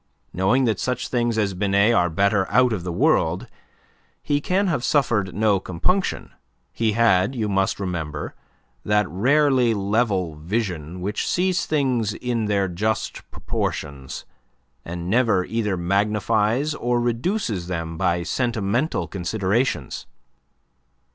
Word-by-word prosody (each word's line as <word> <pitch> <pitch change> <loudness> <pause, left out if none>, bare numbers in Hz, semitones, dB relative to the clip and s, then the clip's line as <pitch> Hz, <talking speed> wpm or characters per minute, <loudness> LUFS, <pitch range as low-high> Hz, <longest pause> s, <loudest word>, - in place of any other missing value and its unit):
Knowing 95 +9 +2
that 110 -3 0
such 125 -1 -2
things 120 -2 0
as 100 -3 +1
Binet 100 +4 +3
are 90 -6 +3
better 100 +3 +1
out 125 -2 +4
of 95 -5 -3
the 90 - -3
world, 85 - +2 0.8
he 145 0 0
can 190 +6 +1
have 155 -10 0
suffered 110 - +1
no 105 -1 +3
compunction; 135 - -1 0.4
he 110 -2 0
had, 110 0 +3
you 110 -3 -1
must 95 -1 0
remember, 80 -6 -4 0.5
that 105 0 +2
rarely 130 - +3
level 100 -4 0
vision 90 -2 -3
which 100 +4 -2
sees 180 0 +1
things 125 -8 0
in 120 -3 -2
their 100 -2 +1
just 105 +5 -3
proportions, 70 -3 -4 0.6
and 85 0 -6
never 110 -3 +2
either 105 -4 -1
magnifies 105 - +1
or 120 -4 0
reduces 120 - -1
them 85 -2 -4
by 85 +1 0
sentimental 120 - -1
considerations. 95 - -1
105 Hz, 125 wpm, -23 LUFS, 90-120 Hz, 0.8 s, out